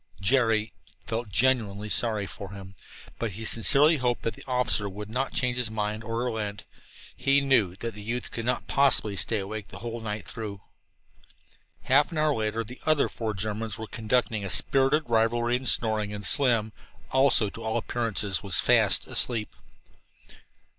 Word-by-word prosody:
Jerry 110 0 +2 0.3
felt 115 0 -4
genuinely 105 -2 +1
sorry 110 -1 +1
for 100 +1 -8
him, 95 -1 -10 0.5
but 115 -4 -3
he 110 +4 -6
sincerely 140 +9 +4
hoped 125 -2 -1
that 115 - -1
the - - -12
officer 125 -5 +1
would 105 +2 -8
not 130 +3 -2
change 125 -2 0
his 125 -3 0
mind 105 0 -3
or 115 +1 -3
relent. 105 -4 -4 0.5
He 140 +1 +3
knew 125 -10 +2
the 110 0 -6
youth 120 +4 -3
could 115 - -5
not 125 0 -1
possibly 135 -7 +3
stay 110 +3 0
awake 105 +1 -5
the 95 - -11
whole 115 +3 -6
night 105 -4 -5
through. 105 -3 -6 1.2
Half 145 +6 +3
an 165 - -5
hour 155 -1 +2
later 110 -1 -2
the 125 +4 -12
other 155 -2 +2
four 110 -2 -4
Germans 105 +1 -3
were 110 - -6
conducting 110 -1 -1
a 95 - -4
spirited 135 +8 +3
rivalry 120 +1 +2
in 130 +1 -2
snoring, 110 -3 +3
and 105 0 -6
Slim, 115 -6 +2 0.4
also, 130 -6 +3
to 115 - -10
all 110 0 -1
appearances, 110 -5 -1
was 100 -2 -4
fast - - +4
asleep. 115 -4 -2
115 Hz, 165 wpm, -27 LUFS, 105-125 Hz, 1.2 s, sincerely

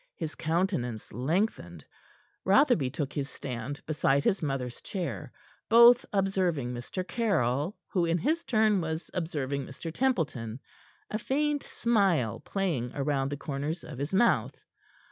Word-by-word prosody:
His 160 -2 -4
countenance 160 - -1
lengthened. 125 - -1 0.6
Rotherby 195 - +4
took 140 +1 -4
his 140 -2 -3
stand 130 +2 -6
beside 140 -2 +2
his 195 - +1
mother's 135 -5 -3
chair, 185 -4 -4 0.4
both 235 +2 +8
observing 185 -10 0
Mr. 150 +10 -5
Caryll, 165 - 0
who, 180 -4 +1
in 165 +1 +2
his 320 - 0
turn, 215 -4 +3
was 160 0 -4
observing 145 -6 -2
Mr. 160 +4 -7
Templeton, 145 - -1 0.5
a 215 - -1
faint 290 +4 0
smile 195 - +1
playing 165 -12 -2
round 140 -1 0
the 145 - -3
corners 145 +4 -4
of 135 -4 -8
his 145 +2 -3
mouth. 230 +5 +2
160 Hz, 130 wpm, -29 LUFS, 135-195 Hz, 0.6 s, both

